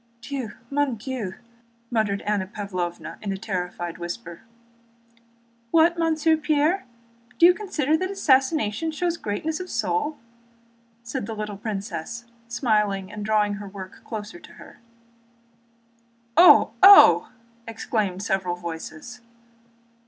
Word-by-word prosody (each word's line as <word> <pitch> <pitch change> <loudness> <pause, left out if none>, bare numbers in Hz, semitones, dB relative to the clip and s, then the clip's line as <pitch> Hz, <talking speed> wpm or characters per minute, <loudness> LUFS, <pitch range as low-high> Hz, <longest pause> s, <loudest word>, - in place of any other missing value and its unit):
"Dieu! 255 -3 -5 0.2
Mon 285 -3 +1
Dieu!" 225 -4 -5 0.6
muttered 215 -4 0
Anna 205 -3 -1
Pávlovna 185 -4 -5
in 200 - -3
a 195 - -3
terrified 180 -4 -4
whisper. 175 0 -7 1.3
"What, 330 +3 +4
Monsieur 320 -1 +2
Pierre... 310 +3 +1 0.5
Do 340 - +6
you 355 - +8
consider 325 -7 -1
that 370 +4 -1
assassination 270 - +1
shows 340 +2 -1
greatness 310 - -3
of 365 0 -7
soul?" 315 -9 -1 0.9
said 230 -3 -5
the 225 - -5
little 210 -1 -5
princess, 205 +1 -5 0.2
smiling 210 -5 0
and 210 0 -6
drawing 210 -1 +1
her 205 - -8
work 190 -1 -10
nearer 220 +10 -6
to - - -15
her. - - -15 1.6
"Oh! 355 - +7
Oh!" 395 +1 +8 0.4
exclaimed 215 -4 -2
several 190 -3 -1
voices. 170 +7 -8
220 Hz, 115 wpm, -24 LUFS, 200-310 Hz, 1.6 s, you